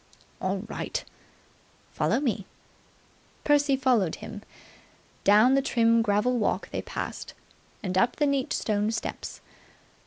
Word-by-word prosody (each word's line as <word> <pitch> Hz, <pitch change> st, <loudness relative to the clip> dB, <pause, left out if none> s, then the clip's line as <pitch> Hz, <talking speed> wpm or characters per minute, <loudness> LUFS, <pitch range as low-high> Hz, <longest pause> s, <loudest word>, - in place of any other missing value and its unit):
"All 190 Hz, +1 st, -1 dB
right." -, -, -4 dB, 0.9 s
"Follow -, -, +1 dB
me." 230 Hz, -8 st, -2 dB, 1.0 s
Percy 290 Hz, -1 st, +3 dB
followed 245 Hz, -10 st, +2 dB
him. 205 Hz, -, -9 dB, 0.8 s
Down 215 Hz, +6 st, +6 dB
the 275 Hz, -, +4 dB
trim 230 Hz, -3 st, +3 dB
gravel 225 Hz, +3 st, +1 dB
walk 215 Hz, -, -1 dB
they -, -, -2 dB
passed, -, -, -6 dB, 0.5 s
and 185 Hz, -2 st, -2 dB
up 235 Hz, +6 st, +3 dB
the 295 Hz, -, +1 dB
neat 280 Hz, -2 st, 0 dB
stone 210 Hz, -1 st, 0 dB
steps. 225 Hz, -, -5 dB
230 Hz, 120 wpm, -27 LUFS, 205-265 Hz, 1.0 s, Down